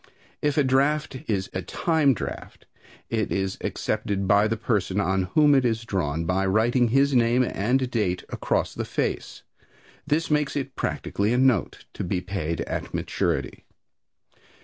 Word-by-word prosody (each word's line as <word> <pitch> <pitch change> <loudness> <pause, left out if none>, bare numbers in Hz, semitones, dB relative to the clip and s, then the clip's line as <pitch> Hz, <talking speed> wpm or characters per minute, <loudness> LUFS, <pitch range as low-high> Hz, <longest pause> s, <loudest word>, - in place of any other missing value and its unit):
If 145 0 0
a 150 - +5
draft 140 +3 +1
is 95 -4 -1
a 95 - -2
time 155 - +1
draft - - -7 0.5
it 110 -3 -1
is 95 -1 -1
accepted 100 -1 -2
by 100 +2 +4
the 115 +1 -1
person 105 -4 0
on 95 -1 +1
whom 150 -2 +6
it 135 -2 +4
is 115 -2 0
drawn 85 -6 -1
by 90 +3 +1
writing 120 +5 +3
his 135 +4 +3
name 120 +1 +4
and 125 +4 0
date 95 -7 0
across - - -1
the - - -3
face. - - -3 0.6
This 155 +2 0
makes 150 -1 +1
it 135 -2 -3
practically 105 +3 -1
a - - +2
note, 130 -6 +1
to - - -4
be 90 +1 -1
paid 90 -3 -3
at - - -4
maturity. - - -2
115 Hz, 155 wpm, -25 LUFS, 95-135 Hz, 0.6 s, whom